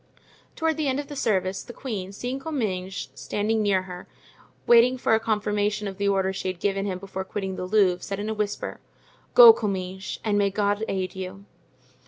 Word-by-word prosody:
Toward 320 -2 0
the 310 -2 0
end 265 +1 0
of 290 0 -6
the 290 - -6
service, 190 -6 0
the 240 - -10
queen, 205 -9 -5
seeing 245 +6 -4
Comminges 200 - -3
standing 215 +2 -1
near 195 -3 +2
her, 180 -1 -9 0.6
waiting 240 +2 +6
for 245 - +1
a 220 - +5
confirmation 210 -1 -1
of 195 0 -7
the 200 - +1
order 190 -1 +1
she 190 - -4
had 185 -2 -3
given 195 +1 -1
him 185 -2 -2
before 190 0 -6
quitting 190 -1 -4
the 180 - -4
Louvre, 185 -3 +3
said 195 0 -5
in 205 - -3
a 220 - -1
whisper: 210 -1 -3 0.6
"Go, 475 -2 +11
Comminges, 190 - -4
and 205 -1 +2
may 200 -1 +3
God 205 +1 0
aid 185 -1 -3
you!" 190 +1 -7
205 Hz, 195 wpm, -25 LUFS, 190-220 Hz, 0.6 s, Go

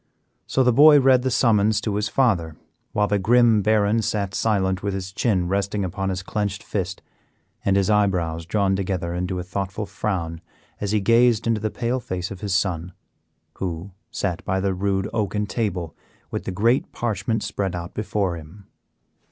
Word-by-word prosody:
So 130 - +2
the 125 -1 +4
boy 150 +3 +8
read 130 -2 +5
the 130 - 0
summons 110 -4 +3
to 105 - -2
his 105 0 -1
father, 95 - +1 0.4
while 105 0 +1
the 105 0 +1
grim 115 +1 +4
Baron 105 +1 +2
sat 105 -3 -2
silent 95 -4 +1
with 100 -1 -2
his 95 -1 -5
chin 95 -5 +1
resting 100 +1 -1
upon 95 +2 -3
his 95 -1 -3
clenched 100 0 -3
fist 95 -2 -4 0.6
and 95 - +2
his 100 -1 +2
eyebrows 90 -6 +1
drawn 100 0 +1
together 90 -3 -2
into 90 +1 -2
a 90 - -3
thoughtful 95 +3 -4
frown 85 -7 -3 0.4
as 100 -1 -2
he 105 -1 +2
gazed 115 +1 +4
into 115 -2 +1
the 110 - 0
pale 120 +4 -2
face 95 -5 -4
of 100 - -8
his 100 -3 -1
son, 90 -2 -1 0.6
who 90 +1 -4 0.2
sat 90 -3 -3
by 95 +1 0
the 95 0 0
rude 95 +1 -1
oaken 105 -2 -1
table 95 -8 -3 0.4
with - - -4
the - - -3
great 115 +7 +1
parchment 110 -1 -2
spread 100 -3 -2
out 85 0 -6
before 100 -4 -1
him. 85 +6 -13
100 Hz, 175 wpm, -23 LUFS, 95-110 Hz, 0.6 s, boy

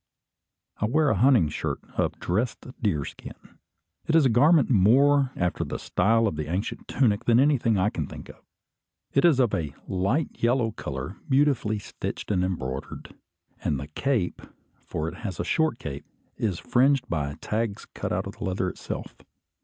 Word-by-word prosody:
I - - 0
wear 150 +5 +3
a - - +2
hunting 120 - +5
shirt 75 - -3 0.2
of - - -1
dressed 110 +7 -1 0.2
deerskin. 80 - -4 0.5
It 160 - +2
is 160 -3 +6
a - - +5
garment 145 +6 +5
more 135 +6 +5
after 90 -1 -1
the - - -4
style 115 +2 +2
of 80 -8 -1
an 75 - -3
ancient 90 +5 -3
tunic 110 -6 +1
than 120 0 +5
anything 130 -6 +3
I 100 +3 +2
can 75 -4 -3
think - - -10
of. - - -12 0.8
It 140 - +4
is 155 -6 +5
of 120 -5 +3
a 75 -7 -2
light 100 - -1
yellow 120 -1 +2
colour, 70 -4 -6
beautifully 135 -6 +2
stitched 105 - -5
and 90 -3 +2
embroidered; 70 -8 -4 0.5
and 70 - 0
the 70 +2 -7
cape, 115 - -1 0.4
for 80 - -4
it 85 +2 -6
has 95 -7 -5
a - - 0
short 160 -7 +1
cape, 70 - -7 0.3
is 100 -6 -1
fringed 130 +4 +2
by 70 -3 -2
tags 110 -1 -2
cut - - -5
out - - -1
of - - -8
the - - -7
leather 95 0 -1
itself. - - -7
110 Hz, 170 wpm, -26 LUFS, 90-130 Hz, 0.8 s, is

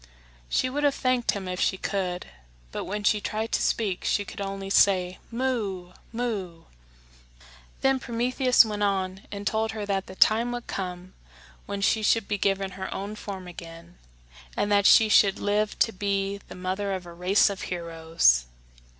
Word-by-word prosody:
She - - +1
would 285 +3 -2
have 285 -1 +3
thanked 255 -2 +1
him 195 -2 -5
if 180 0 -4
she 190 - +1
could; 185 -3 -2 0.5
but - - -4
when 205 +2 -4
she 210 0 +3
tried 220 +2 -3
to - - +1
speak 200 -5 0
she 205 - 0
could 200 - -8
only 195 0 -4
say, 185 -2 +3
"Moo! 225 -8 -2 0.2
moo!" 205 -8 -4 1.2
Then 270 0 +3
Prometheus 250 +1 +3
went 210 -1 -4
on 195 -1 -1
and 200 0 -6
told 220 +2 0
her 215 -2 -4
that 195 -1 -2
the 190 - -10
time 230 +5 +4
would 240 -1 -5
come 180 -1 -5 0.5
when 200 0 -4
she 215 +2 +2
should 215 0 +2
be 205 -1 -2
given 195 -1 0
her 190 0 -6
own 200 +2 -5
form 195 -3 -7
again, 170 0 -11 0.6
and 205 - 0
that 200 -1 +5
she 220 - +7
should 200 -2 +5
live 205 +1 0
to 225 - +3
be 200 0 -2
the - - -10
mother 190 +2 -2
of 185 -2 -5
a 170 - -10
race 185 +4 +3
of 195 - -6
heroes. 165 - +2
200 Hz, 175 wpm, -26 LUFS, 185-220 Hz, 1.2 s, she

